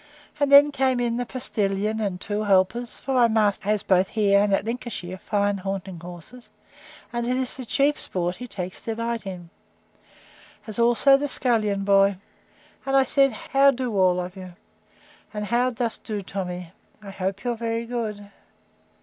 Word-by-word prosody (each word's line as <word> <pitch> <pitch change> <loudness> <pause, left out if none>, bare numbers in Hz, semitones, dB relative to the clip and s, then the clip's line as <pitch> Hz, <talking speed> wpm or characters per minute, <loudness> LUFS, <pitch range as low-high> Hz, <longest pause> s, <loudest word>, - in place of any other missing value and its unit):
And 285 -1 +1
then 285 +1 +8
came 260 -2 +1
in 240 -1 0
the 245 -1 -3
postilion, 215 -4 -1
and 195 -4 -2
two 210 +2 -3
helpers, 205 +4 +1
(for 270 - -4
my 245 -2 +5
master 215 -2 +1
has 210 -1 +1
both 185 0 +3
here, 200 -2 +3
and 205 0 +1
at 195 +1 +1
Lincolnshire, 225 -6 -5
fine 205 -1 0
hunting 190 -2 -5
horses; 180 +8 -11 0.6
and 235 0 -2
it 250 +1 0
is 260 -1 -2
the 260 - -7
chief 285 +4 +2
sport 180 0 -2
he 250 - -7
takes 185 -5 -6
delight 230 -1 -3
in,) 175 -3 -8 1.1
as 215 0 -6
also 240 +4 +5
the 290 +1 -2
scullion 215 -7 0
boy: 195 -1 +4 0.7
And 270 0 +1
I 270 - +6
said, 275 +1 +3
How 275 +5 +3
do 250 -4 -2
all 185 -2 +3
of 180 +1 -5
you? 185 -2 -9 0.8
And 210 0 -3
how 240 +4 +1
dost 235 -1 -3
do, 210 -3 -4
Tommy? 180 -3 -5 0.3
I 200 - -8
hope 190 0 -4
you're 245 -1 0
very 230 0 -3
good. 215 -4 -5
215 Hz, 170 wpm, -24 LUFS, 195-245 Hz, 1.1 s, then